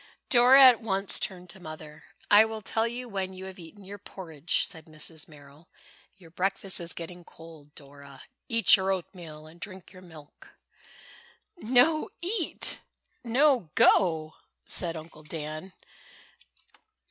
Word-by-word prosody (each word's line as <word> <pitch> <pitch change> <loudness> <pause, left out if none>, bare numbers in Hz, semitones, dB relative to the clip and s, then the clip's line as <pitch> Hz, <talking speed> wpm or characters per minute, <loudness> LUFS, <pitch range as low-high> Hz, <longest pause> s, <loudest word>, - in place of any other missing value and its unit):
Dora 255 +2 +7
at 250 -2 +7
once 195 -3 0
turned 180 -2 -4
to 190 - -12
Mother. 155 -2 -10 0.3
"I 205 +1 +9
will 220 -1 -5
tell 225 +3 0
you 245 +2 -5
when 190 -3 -4
you 190 0 -8
have 190 -1 -10
eaten 180 +5 -13
your 200 +2 -10
porridge," 170 -4 -2
said 160 -2 -7
Mrs. 155 +2 -4
Merrill. 145 +2 -17 0.5
"Your 170 -4 -17
breakfast 195 +2 -1
is 170 -1 -2
getting 175 +1 -8
cold, 160 -3 -15
Dora. 140 -1 -13 0.3
Eat 230 -1 +6
your 190 -1 -1
oatmeal 170 -4 -6
and 160 +2 -16
drink 185 0 -10
your 185 - -13
milk." 160 -5 -16 1.0
"No 310 - +2
eat—no 290 - -1
go," 160 -4 +3 0.3
said 170 -2 -3
Uncle 155 -1 -12
Dan. 155 +3 -7
180 Hz, 135 wpm, -27 LUFS, 155-215 Hz, 1.0 s, I